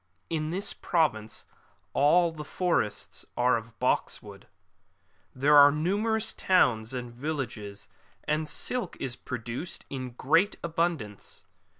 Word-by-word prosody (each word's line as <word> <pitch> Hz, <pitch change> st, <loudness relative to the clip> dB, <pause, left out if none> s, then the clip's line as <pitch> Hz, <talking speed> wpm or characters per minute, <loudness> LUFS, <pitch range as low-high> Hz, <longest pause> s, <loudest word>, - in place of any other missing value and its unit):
^ -, -, -45 dB, 0.3 s
[In 155 Hz, -1 st, -1 dB
this 190 Hz, +5 st, -1 dB
province 115 Hz, -11 st, 0 dB, 0.5 s
all 165 Hz, +4 st, +4 dB
the 155 Hz, -2 st, -7 dB
forests 170 Hz, -, -1 dB
are 125 Hz, +1 st, +4 dB
of 115 Hz, -1 st, -6 dB
box -, -, +1 dB
wood.''] -, -, -12 dB, 0.9 s
There 140 Hz, +3 st, +4 dB
are 145 Hz, 0 st, +9 dB
numerous 205 Hz, +8 st, 0 dB
towns 120 Hz, -11 st, +2 dB
and 125 Hz, -2 st, -5 dB
villages, 120 Hz, -7 st, -5 dB, 0.4 s
and 155 Hz, 0 st, -1 dB
silk 245 Hz, -8 st, -2 dB
is 125 Hz, -2 st, -2 dB
pro 125 Hz, -, -5 dB
duced 120 Hz, +9 st, -6 dB
in 130 Hz, -3 st, -5 dB
great 165 Hz, -, +2 dB
abundance. 165 Hz, -, -2 dB
145 Hz, 125 wpm, -28 LUFS, 120-170 Hz, 0.9 s, are